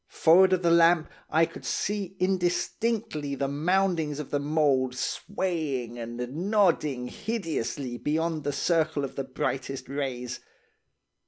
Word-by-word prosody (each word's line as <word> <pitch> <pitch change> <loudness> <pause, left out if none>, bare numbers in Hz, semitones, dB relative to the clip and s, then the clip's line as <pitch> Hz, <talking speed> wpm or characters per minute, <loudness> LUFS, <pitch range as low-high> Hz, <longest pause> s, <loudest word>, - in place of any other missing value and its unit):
Forrard 185 +4 +5
of 185 -1 +1
the 170 - +4
lamp, 170 -1 +5 0.2
I 160 +1 +4
could - - -11
see 200 -2 -2
indistinctly 185 -2 0
the 140 0 -1
moundings 160 0 +1
of 150 - -6
the 145 - +1
mould 140 -4 +1
swaying 140 - -2
and 120 0 -6 0.3
nodding 155 - +2
hideously 155 - -3
beyond 160 +1 -1
the 145 - -1
circle 155 0 +1
of 135 - -9
the 135 - -2
brightest 135 0 -3
rays. 130 -3 -4
155 Hz, 130 wpm, -27 LUFS, 135-180 Hz, 0.3 s, Forrard